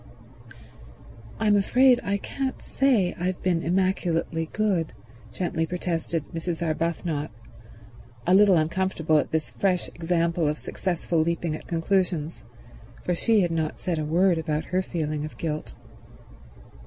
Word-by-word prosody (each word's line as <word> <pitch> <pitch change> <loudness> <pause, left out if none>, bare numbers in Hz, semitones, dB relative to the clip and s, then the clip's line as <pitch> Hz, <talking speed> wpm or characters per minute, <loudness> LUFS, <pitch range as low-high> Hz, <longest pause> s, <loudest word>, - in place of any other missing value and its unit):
"I'm 210 -1 +4
afraid 250 +5 +5
I 200 0 0
can't 265 +6 -4
say 235 -10 +2
I've 180 +1 -1
been 175 -3 +2
immaculately 170 -2 0
good," 195 - 0 0.4
gently 165 -3 -1
protested 170 -3 -2
Mrs. 165 0 -3
Arbuthnot, 160 -1 -1 1.0
a 180 - +3
little 195 -2 +6
uncomfortable 160 -1 +1
at - - -2
this 160 -1 -2
fresh 185 -3 0
example 170 -1 0
of 150 +1 0
successful 175 -1 -2
leaping 170 0 0
at - - -10
conclusions, 170 -2 -1 0.6
for 180 - 0
she 215 +4 +3
had 175 -2 +1
not 160 -2 -1
said 170 -3 -2
a - - -1
word 170 +2 +3
about 155 -1 -2
her 185 - +3
feeling 155 -5 -3
of 155 - -7
guilt. 155 -2 -4
170 Hz, 130 wpm, -26 LUFS, 160-185 Hz, 1.0 s, little